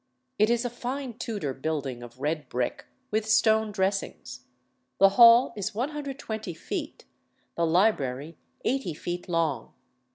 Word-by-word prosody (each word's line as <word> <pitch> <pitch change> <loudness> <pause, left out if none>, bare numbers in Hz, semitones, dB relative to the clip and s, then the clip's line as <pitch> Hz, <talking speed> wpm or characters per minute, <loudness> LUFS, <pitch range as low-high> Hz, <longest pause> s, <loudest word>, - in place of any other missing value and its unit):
It 215 +1 +5
is 235 +1 +1
a - - 0
fine 250 +1 -4
Tudor 205 - -3
building 135 -3 -3
of 120 +1 -12
red 150 -1 -2
brick, 125 0 -2 0.3
with 215 0 0
stone 220 0 +4
dressings. 195 0 -3 0.5
The 195 - +7
hall 235 +4 +7
is 200 -1 -4
120 260 - -4
feet, - - -6 0.5
the 170 -1 +1
library 160 - +1 0.3
80 245 - -1
feet 175 +3 -5
long. 160 -8 -1
195 Hz, 130 wpm, -27 LUFS, 155-230 Hz, 0.5 s, The